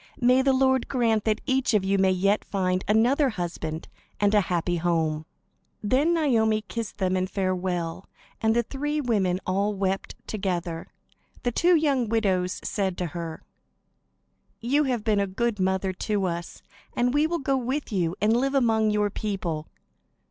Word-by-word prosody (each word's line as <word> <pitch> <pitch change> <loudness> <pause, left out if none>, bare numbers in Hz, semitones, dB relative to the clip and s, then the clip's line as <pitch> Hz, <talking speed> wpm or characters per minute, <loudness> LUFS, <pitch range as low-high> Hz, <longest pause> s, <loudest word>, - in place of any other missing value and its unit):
May 250 +1 +4
the 270 0 +3
Lord 260 -1 +2
grant 230 -5 +1
that 215 -1 +1
each 260 -4 +1
of 205 - +3
you 195 0 +2
may 190 0 +4
yet 195 +3 +2
find 185 -2 -1
another 250 +7 +3
husband 170 -5 -4 0.3
and 205 0 +3
a 210 - +5
happy 175 -1 -1
home." 160 -2 0 0.6
Then 280 +10 +2
Naomi 220 -9 +2
kissed 225 0 -5
them 190 -2 0
in 185 0 0
farewell, 185 -2 -2 0.3
and 220 0 +2
the 235 - +3
three 295 +5 -2
women 200 -9 +1
all 200 +3 0
wept 195 0 -2
together. 175 -5 -3 0.6
The 245 - +1
two 345 +8 +4
young 275 -7 +1
widows 190 -5 0
said 190 -3 -1
to 180 - -2
her: 165 -2 -6 1.2
"You 280 +6 +2
have 245 -5 -1
been 215 -2 +2
a 200 - +1
good 210 +3 -1
mother 190 0 0
to 200 +1 -1
us, 170 -1 -5 0.3
and 245 +1 +1
we 295 +2 +3
will 340 +1 -1
go 275 -2 0
with 265 +2 -2
you, 175 -4 0
and 215 +2 +3
live 270 +3 +1
among 225 -4 +3
your 210 -1 +1
people." 180 -8 -3
210 Hz, 165 wpm, -26 LUFS, 185-245 Hz, 1.2 s, a